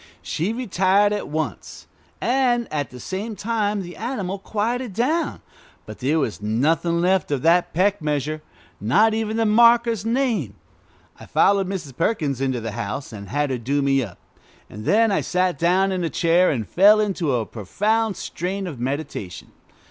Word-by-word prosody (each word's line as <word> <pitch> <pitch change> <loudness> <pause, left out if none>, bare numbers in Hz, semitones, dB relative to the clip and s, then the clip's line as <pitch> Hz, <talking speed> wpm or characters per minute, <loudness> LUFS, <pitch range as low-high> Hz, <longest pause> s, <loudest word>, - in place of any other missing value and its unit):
She 170 +7 -2
retired 205 -3 +2
at 210 - -3
once. 150 -7 -5 0.3
And 245 -1 +1
at 145 -3 -2
the 125 - -11
same 200 - -5
time 210 -2 -1
the 175 0 -9
animal 200 -4 -4
quieted 225 +3 -2
down, 275 - -1 0.4
but - - -10
there 140 +5 +1
was 115 -9 -2
nothing 155 +10 +1
left 185 +1 +2
of 140 -3 -1
that 175 +2 +3
peck 195 +3 +1
measure, 150 0 -2 0.4
not 175 - +3
even 220 0 -2
the 225 - +2
maker's 235 0 +4
name. 225 - 0 0.6
I - - -12
followed 195 -1 +3
Mrs. 170 -9 -5
Perkins 150 - -1
into 130 -2 0
the 115 -1 -5
house, 105 +6 -5
and 100 -2 -9
had 145 0 0
her 125 - -2
do 140 +5 0
me 135 -1 +2
up, 105 -8 -7 0.5
and 105 +2 -9
then 225 +1 +3
I 195 - +1
sat 180 0 0
down 185 +3 +2
in 185 -2 -2
a 165 - 0
chair 175 +2 +3
and 115 -7 -2
fell 205 +4 +5
into 185 -10 0
a 115 -2 -1
profound 210 - -1
strain 190 +3 -4
of 155 -9 -6
meditation. 130 - -5
180 Hz, 170 wpm, -22 LUFS, 140-215 Hz, 0.6 s, fell